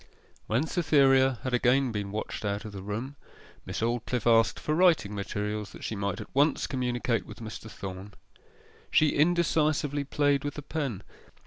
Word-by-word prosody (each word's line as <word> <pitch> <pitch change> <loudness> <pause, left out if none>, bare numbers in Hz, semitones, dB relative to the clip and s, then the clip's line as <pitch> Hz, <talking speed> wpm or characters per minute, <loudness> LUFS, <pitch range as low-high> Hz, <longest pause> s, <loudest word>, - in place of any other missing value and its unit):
When 120 +8 +1
Cytherea 135 -6 +3
had 130 - -3
again 125 +1 +3
been 100 -2 -4
watched 110 +1 -4
out 100 +1 -2
of 110 - -6
the 100 -1 -7
room, 115 +8 -5 0.5
Miss - - -4
Aldclyffe 120 0 -1
asked 115 -1 +4
for 150 - -1
writing 160 - +3
materials, 105 +1 -4
that - - -11
she 110 - -3
might 100 0 -2
at 105 - -9
once 145 +2 +3
communicate 125 -2 -1
with - - -10
Mr. 110 0 -8
Thorn. 95 0 -8 0.7
She 155 - +4
indecisively 155 -3 +2
played 145 0 +1
with 145 -1 -4
the 150 - -6
pen. 135 - -3
125 Hz, 160 wpm, -28 LUFS, 105-145 Hz, 0.7 s, asked